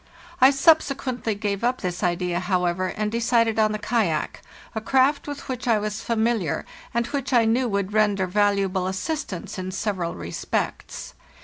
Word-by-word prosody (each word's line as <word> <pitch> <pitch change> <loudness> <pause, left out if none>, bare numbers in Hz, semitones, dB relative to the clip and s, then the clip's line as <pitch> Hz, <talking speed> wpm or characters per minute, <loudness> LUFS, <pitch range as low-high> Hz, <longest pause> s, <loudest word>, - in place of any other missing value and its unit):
I 260 - +9
subsequently 275 -5 +2
gave 200 0 -2
up 250 +1 +1
this 180 -2 -3
idea, 175 0 0
however, 180 0 0
and 210 +2 -2
decided 230 -1 +2
on 215 -1 +4
the 215 - -1
kayak, 210 -8 -1 0.3
a 220 - -3
craft 265 +6 +2
with 290 -1 -6
which 250 -1 -4
I 230 -2 +4
was 210 0 -3
fa 230 - -1
miliar, 220 -7 0 0.3
and 235 0 0
which 275 +2 -3
I 240 -3 +5
knew 240 +3 +2
would 200 -2 -1
render 205 -3 +2
valuable 195 -1 +1
assist 200 +12 -3
ance 185 +1 -6
in 185 0 -4
several 185 -3 -2
respects. 85 0 -4
215 Hz, 170 wpm, -24 LUFS, 185-240 Hz, 0.3 s, I